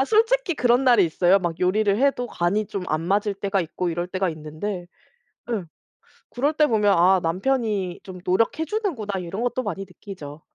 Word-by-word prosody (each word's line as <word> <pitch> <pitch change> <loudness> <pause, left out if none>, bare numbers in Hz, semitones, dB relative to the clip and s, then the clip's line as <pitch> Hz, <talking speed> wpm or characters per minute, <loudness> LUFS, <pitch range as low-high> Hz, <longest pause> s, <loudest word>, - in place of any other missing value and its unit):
아 270 - +4
솔직히 450 - +2
그런 245 0 +3
날이 240 -7 +6
있어요. 175 +4 +3
막 170 -3 -3
요리를 200 +2 +2
해도 275 -3 +2
간이 200 +4 0
좀 195 -3 -5
안 155 +1 0
맞을 200 +4 0
때가 195 0 -1
있고 170 +2 -3
이럴 175 +1 -2
때가 185 0 -1
있는데 160 +5 -5 0.7
예 210 -5 -1 0.7
그럴 285 +5 0
때 305 0 +4
보면 210 -3 +3
'아 185 +2 +5
남편이 195 0 -1
좀 185 -1 -9
노력해 225 - +1
주는구나. 280 - -2
이런 180 +5 -5
것도 245 +1 -1
많이 195 -2 -4
느끼죠. 170 -5 -10
200 Hz, 345 characters per minute, -23 LUFS, 180-245 Hz, 0.7 s, 날이